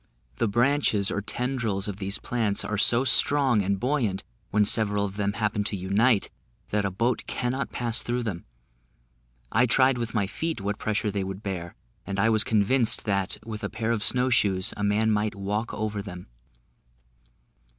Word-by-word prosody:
The - - +1
branches 120 -2 +2
or 105 - -1
tendrils 115 -3 -2
of 100 -2 -4
these 100 0 -1
plants 110 -4 0
are 105 -2 -2
so 120 +4 +4
strong 135 -2 +4
and 100 0 -1
buoyant, 120 -7 0 0.3
when 105 0 +3
several 105 -1 +2
of 100 -1 -6
them 100 -1 -1
happen 105 -1 -1
to 100 - -1
unite, 100 +4 +2 0.4
that 105 -1 +1
a - - +1
boat 115 +7 -1
cannot 130 +2 -2
pass 120 -1 0
through 120 +1 -2
them; 95 -7 -4 1.1
I 125 +3 +3
tried 130 +2 +4
with 115 -1 -4
my 100 -3 +2
feet 160 +9 -3
what 100 +1 -3
pressure 110 0 -1
they 100 -1 -2
would 95 +2 -6
bear, 90 -3 -5 0.3
and 100 0 -4
I 110 +3 +3
was 110 -2 +3
convinced 110 +3 +2
that, 100 -3 -1
with 110 -2 -6
a - - -2
pair 115 0 -2
of 115 -3 0
snow 125 +3 +2
shoes, 95 -5 +2
a 105 - -4
man 105 +2 +2
might 105 0 0
walk 105 +3 -2
over 105 -1 -3
them. 90 -3 -9
105 Hz, 180 wpm, -26 LUFS, 100-120 Hz, 1.1 s, so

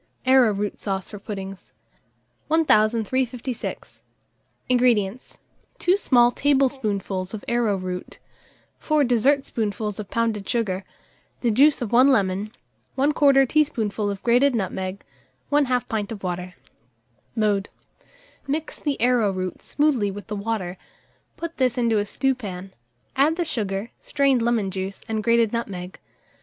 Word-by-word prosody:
ARROWROOT 220 -6 +3
SAUCE 195 -2 -3
FOR 205 - -8
PUDDINGS. 195 -2 -7 0.8
1356. 250 -3 0 0.7
INGREDIENTS. 245 -3 +1 0.4
2 360 - +3
small 245 -11 +4
teaspoonfuls 225 -9 0
of 210 - -9
arrowroot, 195 -6 -1 0.6
4 305 -2 +2
dessert 270 +3 +2
spoonfuls 210 -2 -3
of 205 -2 -6
pounded 225 -3 -1
sugar, 200 -6 -1 0.6
the 235 - +2
juice 275 +4 +4
of 220 - -5
1 250 +3 +6
lemon, 200 -2 +1 0.5
1/4 275 -1 +4
teaspoonful 220 -9 0
of 200 -1 -5
grated 250 +3 +4
nutmeg, 190 -2 -3 0.5
1/2 260 -4 +2
pint 210 -2 -3
of 205 -3 -7
water. 180 0 -4 0.8
Mode. 210 -3 +1 0.8
Mix 305 +3 -3
the 290 -3 -2
arrowroot 205 -7 +1
smoothly 280 -9 +1
with 200 +1 -7
the 210 - -5
water; 200 -4 -3 0.6
put 335 0 -6
this 255 -2 +1
into 230 -3 +2
a 205 - -1
stewpan; 205 -7 -3 0.4
add 285 +4 +3
the 345 0 -1
sugar, 205 -6 -3
strained 275 -4 +1
lemon 230 -4 +1
juice, 190 +1 -5
and 220 -1 -2
grated 230 -1 +3
nutmeg. 190 -6 -5
225 Hz, 120 wpm, -23 LUFS, 200-260 Hz, 0.8 s, 1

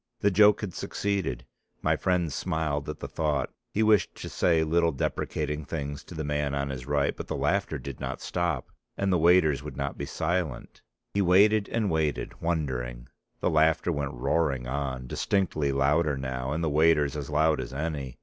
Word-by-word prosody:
The 100 - +3
joke 105 +2 +5
had 100 -5 -4
succeeded; 95 -12 -2 0.4
my - - +3
friend 90 -5 0
smiled 75 -3 -2
at 75 - -5
the - - -4
thought; 75 -2 -1 0.2
he 110 - +1
wished 105 -4 +3
to - - -7
say 80 -2 +2
little 85 +1 +2
deprecating 75 +2 -2
things 70 -1 -5
to 85 - -10
the 80 - -3
man 75 -1 -1
on 70 0 -1
his 65 -1 -6
right; 70 -1 +1
but - - -7
the - - -3
laughter - - 0
did 70 -3 -8
not - - -4
stop 85 -6 -2 0.3
and 100 -1 +1
the 90 - +3
waiters 80 -3 +4
would 65 - -8
not 70 0 -3
be - - -3
silent. 85 -4 -2 0.3
He 100 - +2
waited, 100 +3 +4
and 110 -4 0
waited 80 -2 -1
wondering; 65 -8 -2 0.3
the - - +1
laughter 80 +2 +3
went 70 -3 -2
roaring 65 0 0
on, 65 -1 -3
distinctly 75 -1 0
louder 70 +2 +2
now, 65 0 -3
and 80 +3 -1
the 80 - +1
waiters 75 -2 +3
as 75 -1 -5
loud 75 0 +2
as - - -7
any. 70 -3 -4
75 Hz, 185 wpm, -27 LUFS, 70-85 Hz, 0.4 s, joke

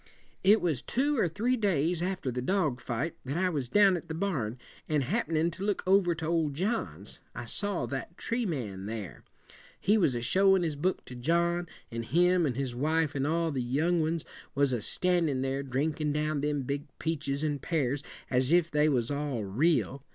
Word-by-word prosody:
"It 205 +3 +6
was 160 -8 0
two 280 +2 0
or 185 - +3
three 225 +10 0
days 175 - +1
after 180 -7 -2
the 125 +1 -3
dog 150 -4 0
fight 135 +7 -3
that 135 +4 -3
I 185 0 +2
was 140 -8 -2
down 200 +1 +5
at 170 - -6
the 160 - -4
barn, 150 - -2 0.3
and 150 -3 +2
happenin' 165 - 0
to 185 - -7
look 205 -1 0
over 185 -2 +4
to 160 0 -5
old 160 -3 0
John's, 125 - -3 0.2
I - - -5
saw 205 - -1
that 140 +6 -5
tree 240 +1 -1
man 105 - -4
there. 110 -4 -6 0.6
He 215 +2 +3
was 140 -10 +2
a 120 - -2
showin' 190 +7 +4
his 160 -3 -1
book 180 +6 -1
to - - -10
John, 170 +7 +1 0.2
and 115 0 -3
him 175 +6 +3
and 125 - -2
his 130 -2 -2
wife 155 +4 +1
and 140 0 -1
all 165 +1 +1
the 135 -3 -1
young 155 +8 +1
ones 160 +1 -1 0.3
was 140 -2 +2
a 120 - -1
standin' 165 - +1
there, 135 +1 -1
drinkin' 145 +3 -1
down 150 0 0
them 145 -1 0
big 140 +2 -3
peaches 145 -3 -2
and 145 -2 -1
pears 145 -4 0 0.3
as 130 +2 +1
if 170 -1 +4
they 150 +1 +3
was 125 -3 0
all 140 -6 -2
real. 135 - +1
155 Hz, 195 wpm, -29 LUFS, 135-175 Hz, 0.6 s, It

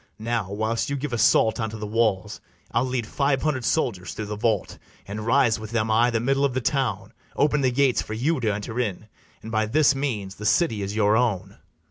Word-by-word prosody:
Now, 110 -3 -2
whilst 110 +4 -1
you 140 - -1
give 140 -1 -4
assault 115 0 +3
unto 110 -1 -3
the 105 - -5
walls, 105 -2 0 0.3
I'll 120 +2 +1
lead 125 -3 -2
five 140 +3 0
hundred 145 -5 0
soldiers 115 - -1
through 110 - -4
the 105 0 -4
vault, 105 -2 -1 0.3
And 105 +2 -5
rise 120 -3 +3
with 110 -1 -7
them 110 -1 0
i' 115 +3 +4
the 115 -2 0
middle 135 +4 +1
of 135 -3 +1
the - - +2
town, 115 -5 -1 0.2
Open 150 0 +2
the 130 - +3
gates 130 0 +2
for 110 - -6
you 145 +7 0
to 110 -3 0
enter 105 +4 -4
in; 110 -2 -3 0.3
And 110 - -7
by 110 0 +1
this 145 +5 +4
means 115 -9 -3
the 105 - -7
city 115 - +2
is 100 +1 -4
your 105 -1 +3
own. 100 -5 -1
115 Hz, 215 wpm, -24 LUFS, 105-130 Hz, 0.3 s, i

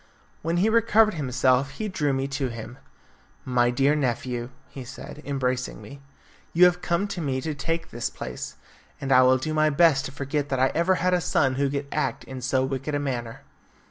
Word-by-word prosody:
When 165 +2 -1
he 190 +5 +3
recovered 225 -1 +4
himself 130 -2 +1
he 215 - -4
drew 155 -8 0
me 135 0 -1
to 140 -1 -1
him. 115 +1 -8 0.7
"My 125 -1 +2
dear 135 +4 +3
nephew," 125 -3 -2 0.2
he 135 - -9
said, 135 +3 -10
embracing 130 -2 -2
me, 140 0 -11 0.5
"you 175 +2 +7
have 180 0 +3
come 175 +3 0
to 180 - -4
me 135 -4 -1
to 155 +1 -3
take 165 +3 -3
his 120 0 -3
place, 65 -1 -7 0.4
and 135 - -3
I 130 -1 +7
will 130 0 +5
do 155 +4 -3
my 155 0 +3
best 150 -2 +4
to - - -5
forget 140 +1 -3
that 130 - -1
I 130 +1 +4
ever 170 +3 +2
had 180 +1 +1
a 180 - +2
son 135 -4 +2
who 140 +1 0
could 140 +1 -3
act 150 - -1
in 130 -1 -8
so 130 +1 +1
wicked 135 +2 -3
a - - 0
manner." 120 -5 -4
140 Hz, 205 wpm, -25 LUFS, 130-160 Hz, 0.7 s, you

